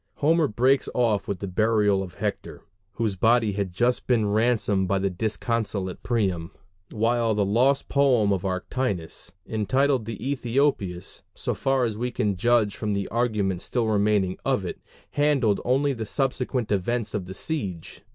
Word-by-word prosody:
Homer 160 +1 +3
breaks 130 +4 +2
off 115 -5 +1
with 100 -3 -3
the 100 - -3
burial 105 0 +2
of 90 -2 -7
Hector, - - -4 0.3
whose 110 -2 -1
body 115 +2 +3
has 100 0 -2
just 120 +7 0
been 120 -4 +3
ransomed 105 -3 +1
by 100 - +1
the 95 0 0
disconsolate 105 -1 -2
Priam; 95 -8 -1 0.4
while 115 0 +1
the 105 -1 +2
lost 130 +7 +2
poem 125 -8 +3
of 95 - -2
Arctinus, 95 -3 -3
entitled 130 +3 +1
the 115 -1 -5
Æthiopis, 120 -7 -1
so - - -2
far 135 -1 +1
as 110 -2 -3
we 125 +1 -1
can 105 -4 -1
judge 110 +1 +2
from 105 -1 -2
the 100 -1 -2
argument 105 -6 0
still 120 -2 -1
remaining 105 -3 +1
of - - 0
it, - - -6 0.3
handled 140 -8 +2
only 135 +3 +2
the 115 -4 -5
subsequent 125 -3 -1
events 110 +3 -1
of 95 -4 -3
the 95 - -7
siege. 95 - -5
110 Hz, 160 wpm, -25 LUFS, 100-125 Hz, 0.4 s, Homer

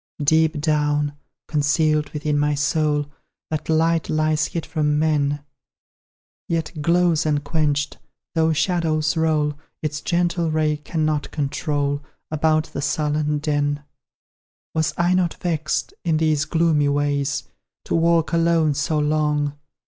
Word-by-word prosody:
Deep 160 +1 +3
down, 150 -1 +1 0.3
concealed 150 0 +1
within 150 0 -2
my 150 0 +2
soul, 150 0 +1 0.5
That 155 0 -3
light 165 +1 +2
lies 155 -1 +1
hid 170 - -4
from 150 -2 0
men; 145 -2 +1 1.1
Yet 160 -2 -2
glows 170 0 +3
unquenched 145 -1 0 0.3
though 160 -1 +2
shadows 155 -1 +1
roll, 155 -2 +1 0.3
Its 150 -1 -2
gentle 170 0 0
ray 155 -1 +1
cannot 155 -1 -1
control 145 -1 -1 0.3
About 155 0 +2
the 140 - -3
sullen 150 0 0
den. 145 -1 -1 0.9
Was 160 0 +1
I 175 +1 +2
not 180 -2 +1
vexed, 155 -3 -2
in 165 -3 +1
these 155 -2 +2
gloomy 160 -4 +2
ways 145 -1 0 0.4
To - - -3
walk 165 0 +2
alone 165 -2 +3
so 145 +3 -1
long? 150 -1 +1
155 Hz, 120 wpm, -22 LUFS, 150-160 Hz, 1.1 s, Deep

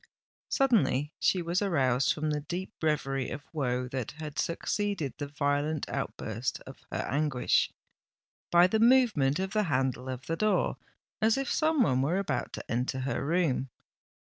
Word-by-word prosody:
Suddenly 155 - +2
she 180 -2 +2
was 170 +3 0
aroused 135 -9 +2
from 155 0 -1
the 150 - 0
deep 180 +7 -5
reverie 135 -4 0
of 145 - -6
woe 125 -4 -1
that 130 -1 -4
had 150 -1 -6
succeeded 170 - -1
the 145 - -3
violent 145 +1 -1
outburst 115 +4 -3
of - - -12
her - - -2
anguish, 145 -3 +2 0.8
by 175 +1 +6
the 215 +4 +1
movement 225 - +4
of 190 +1 -2
the 215 -1 +2
handle 130 -1 0
of 130 0 -5
the 165 - -1
door, 215 +4 +1 0.4
as 220 +3 +4
if 270 0 -2
some 310 -4 +3
one 130 - +2
were 155 +7 +1
about 195 - -2
to - - -6
enter 125 +2 -1
her 135 - -2
room. 150 -4 +1
150 Hz, 160 wpm, -29 LUFS, 135-190 Hz, 0.8 s, by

